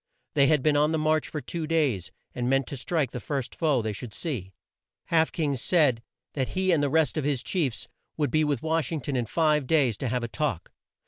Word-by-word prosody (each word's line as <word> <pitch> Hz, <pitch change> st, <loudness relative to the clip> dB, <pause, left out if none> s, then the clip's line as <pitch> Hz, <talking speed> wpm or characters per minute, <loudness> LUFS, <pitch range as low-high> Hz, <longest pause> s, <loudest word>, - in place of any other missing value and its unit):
They 140 Hz, -2 st, +4 dB
had 150 Hz, -3 st, +3 dB
been 150 Hz, -1 st, +3 dB
on 150 Hz, +1 st, +3 dB
the -, -, +2 dB
march 155 Hz, 0 st, +1 dB
for 150 Hz, -, -5 dB
two 160 Hz, +5 st, -4 dB
days, 145 Hz, -, 0 dB, 0.2 s
and 125 Hz, 0 st, -2 dB
meant 135 Hz, 0 st, +2 dB
to -, -, -4 dB
strike 140 Hz, 0 st, -1 dB
the 125 Hz, -, -5 dB
first 135 Hz, -3 st, -3 dB
foe 145 Hz, -8 st, +1 dB
they 110 Hz, -1 st, -2 dB
should 105 Hz, +1 st, -7 dB
see. 115 Hz, -, -4 dB, 0.6 s
Half 160 Hz, -1 st, +3 dB
King 150 Hz, -4 st, -1 dB
said 135 Hz, -3 st, +2 dB, 0.3 s
that 130 Hz, -3 st, -1 dB
he 190 Hz, 0 st, +2 dB
and 160 Hz, -4 st, +3 dB
the 145 Hz, -, +1 dB
rest 160 Hz, 0 st, +2 dB
of -, -, -2 dB
his 140 Hz, -3 st, 0 dB
chiefs 145 Hz, -, -1 dB, 0.3 s
would 150 Hz, -2 st, 0 dB
be 155 Hz, 0 st, +3 dB
with 145 Hz, -5 st, -1 dB
Wash 160 Hz, -3 st, 0 dB
ing 160 Hz, -3 st, -2 dB
ton 135 Hz, +2 st, -3 dB
in 120 Hz, -3 st, -1 dB
five 150 Hz, -1 st, +2 dB
days 135 Hz, -9 st, +3 dB
to 130 Hz, -, -3 dB
have 125 Hz, +1 st, -1 dB
a -, -, -1 dB
talk. 135 Hz, -, -3 dB
145 Hz, 235 wpm, -27 LUFS, 125-155 Hz, 0.6 s, They